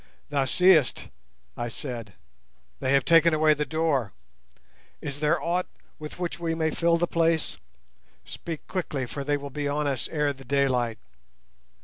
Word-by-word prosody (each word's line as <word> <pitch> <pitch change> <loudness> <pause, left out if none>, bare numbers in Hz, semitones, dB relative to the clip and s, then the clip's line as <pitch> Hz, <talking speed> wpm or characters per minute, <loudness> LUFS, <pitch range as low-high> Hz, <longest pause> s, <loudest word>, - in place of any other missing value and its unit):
"Thou 140 -2 +1
seest," 170 - +4 0.5
I 120 - -3
said, 115 -4 -6 0.7
"they 130 - 0
have 135 -2 +3
taken 165 -1 +5
away 155 0 +5
the 150 -1 -2
door. 145 - 0 0.9
Is 140 -1 -5
there 150 0 +2
aught 175 +2 -1 0.3
with 150 0 -8
which 175 -1 -3
we 165 -1 -1
may 160 -1 0
fill 170 +1 +2
the 175 - +2
place? 165 -2 0 0.7
Speak 165 -3 -7
quickly 150 -8 -3
for 140 +3 -5
they 145 +1 +1
will 140 0 -8
be 145 +1 -2
on 145 +1 -1
us 135 -4 -1
ere 150 -2 0
the 135 0 -14
daylight." 125 -4 +1
150 Hz, 155 wpm, -26 LUFS, 135-165 Hz, 0.9 s, taken